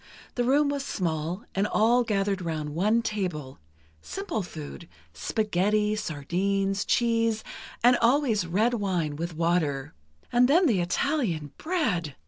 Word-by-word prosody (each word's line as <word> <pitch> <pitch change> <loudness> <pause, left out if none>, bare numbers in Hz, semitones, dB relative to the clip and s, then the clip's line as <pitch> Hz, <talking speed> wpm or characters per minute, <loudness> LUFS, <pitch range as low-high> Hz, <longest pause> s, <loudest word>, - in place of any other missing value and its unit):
The 245 - 0
room 285 +4 +3
was 285 -1 -2
small, 170 - -2
and 195 +2 +1
all 235 +4 +3
gathered 200 -3 0
round 155 -3 -3
one 210 +8 +2
table... 175 - -3 0.4
simple 390 - -4
food, 165 -2 -9 0.2
spaghetti, 210 - 0
sardines, 195 +4 -1
cheese, 230 -2 +1 0.4
and 245 +1 +7
always 235 - +2
red 215 +8 +2
wine 180 -9 -1
with 165 +2 -4
water. 165 -5 0 0.4
And 245 +1 +5
then 340 +7 +4
the 215 - +3
Italian 175 - -1
bread! 215 - -1
200 Hz, 125 wpm, -27 LUFS, 170-235 Hz, 0.4 s, and